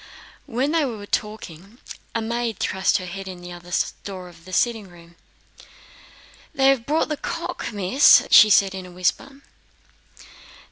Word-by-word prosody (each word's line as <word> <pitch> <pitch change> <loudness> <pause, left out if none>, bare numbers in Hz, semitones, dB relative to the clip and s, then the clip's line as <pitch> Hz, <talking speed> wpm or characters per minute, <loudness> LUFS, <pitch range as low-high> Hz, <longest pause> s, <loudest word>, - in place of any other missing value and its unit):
While 255 +5 -1
they 325 0 +1
were 225 -7 -5
talking 205 -1 -5 0.4
a 225 - -1
maid 230 -1 -3
thrust 190 0 0
her 185 - -7
head 195 +2 -7
in 185 -1 -7
at - - -15
the 175 - -9
other 175 0 -12 0.3
door 185 -2 -8
of 165 -1 -18
the 185 - -12
sitting 225 0 0
room. 170 -1 -17 1.4
"They 270 0 +4
have 260 -4 +1
brought 310 +1 0
the 300 - -2
cock, - - -5
Miss," 205 +6 +5
she 215 - +8
said 195 -1 +4
in 190 -1 -7
a - - -13
whisper. 230 +10 -2
205 Hz, 160 wpm, -22 LUFS, 180-240 Hz, 1.4 s, she